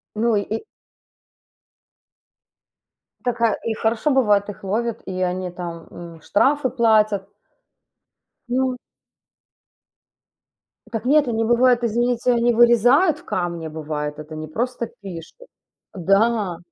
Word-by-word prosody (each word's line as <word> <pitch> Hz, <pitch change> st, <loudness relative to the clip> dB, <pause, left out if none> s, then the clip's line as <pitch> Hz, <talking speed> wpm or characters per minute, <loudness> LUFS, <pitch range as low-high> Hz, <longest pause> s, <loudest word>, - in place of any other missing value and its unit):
Ну 225 Hz, +1 st, +1 dB
и 205 Hz, -, +2 dB
и 220 Hz, -, -4 dB, 2.6 s
Так, 245 Hz, -1 st, -2 dB
э, 230 Hz, -2 st, +3 dB
и -, -, 0 dB
хорошо, 220 Hz, +5 st, 0 dB
бывает, 210 Hz, -6 st, +3 dB
их 205 Hz, -, -9 dB
ловят, 225 Hz, +4 st, -2 dB
и 185 Hz, -1 st, -4 dB
они 180 Hz, 0 st, -2 dB
там, 170 Hz, -2 st, -7 dB
м, 170 Hz, -2 st, -11 dB
штрафы 270 Hz, -, +2 dB
платят. 215 Hz, -5 st, +2 dB, 1.2 s
Ну 255 Hz, +1 st, 0 dB, 2.1 s
Так 225 Hz, 0 st, -4 dB
нет, 290 Hz, +1 st, +4 dB
они 225 Hz, -1 st, 0 dB
бывает, 240 Hz, +1 st, +3 dB
извините, 240 Hz, +2 st, +1 dB
они 240 Hz, 0 st, +2 dB
вырезают 245 Hz, -, +4 dB
в -, -, -19 dB
камне, 170 Hz, -3 st, -3 dB
бывает, 150 Hz, -1 st, -4 dB
это 155 Hz, +1 st, -9 dB
не 155 Hz, 0 st, -6 dB
просто 235 Hz, +7 st, -3 dB
пишут. 195 Hz, -, -10 dB, 0.5 s
Да. 195 Hz, 0 st, +1 dB
220 Hz, 115 wpm, -21 LUFS, 185-240 Hz, 2.6 s, нет